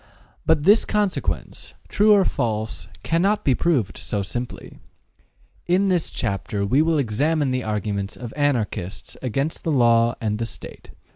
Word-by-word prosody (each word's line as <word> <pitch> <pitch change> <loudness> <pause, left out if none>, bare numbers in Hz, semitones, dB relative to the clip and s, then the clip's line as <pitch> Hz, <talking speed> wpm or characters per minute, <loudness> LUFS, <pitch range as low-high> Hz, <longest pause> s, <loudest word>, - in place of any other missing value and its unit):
But 160 -2 +3
this 205 +6 +6
consequence, 210 -3 -2
true 210 +1 +3
or 200 -2 +6
false, 110 -1 -2 0.2
cannot 190 +6 +1
be 135 - +4
proved 125 - 0
so 105 -2 -3
simply. 120 +5 -6 0.9
In 185 +3 +3
this 180 -3 +1
chapter 100 -2 -2
we 125 +8 +2
shall 160 0 +3
examine 145 +4 +1
the 130 -1 -1
arguments 105 -2 -3
of 120 -2 -7
Anarchists 115 -10 -2
against 135 +7 -2
law 120 -5 +4
and 105 -1 -2
the 115 - -2
State. - - -11
130 Hz, 140 wpm, -23 LUFS, 110-165 Hz, 0.9 s, this